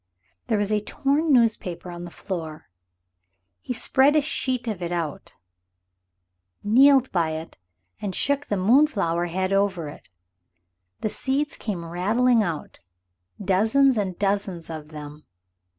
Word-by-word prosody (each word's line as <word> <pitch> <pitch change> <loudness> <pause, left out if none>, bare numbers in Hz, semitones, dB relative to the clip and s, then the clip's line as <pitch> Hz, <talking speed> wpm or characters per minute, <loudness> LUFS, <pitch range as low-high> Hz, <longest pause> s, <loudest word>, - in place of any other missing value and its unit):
There 220 - +1
was 205 0 0
a 210 - +2
torn 285 +8 0
newspaper 205 -8 +1
on 175 0 -7
the - - -8
floor. 160 - -7 0.9
He - - -6
spread 265 +4 +3
a 305 - +5
sheet 255 -4 -1
of 210 -5 -3
it 175 0 -3
out, 165 -4 -4 1.3
kneeled 265 +5 +5
by 165 -3 0
it 160 -8 -8 0.4
and 195 -3 -3
shook 285 0 0
the 205 - -1
moonflower 195 - +2
head 185 +2 -1
over 190 -6 0
it. - - -13 0.9
The 215 - -1
seeds 275 +6 -1
came 185 -6 -5
rattling 220 +8 +2
out 170 -7 -4 0.6
dozens 220 +8 +3
and 190 -5 -2
dozens 195 -4 -2
of 155 -2 -7
them. 150 -1 -10
200 Hz, 135 wpm, -24 LUFS, 170-250 Hz, 1.3 s, a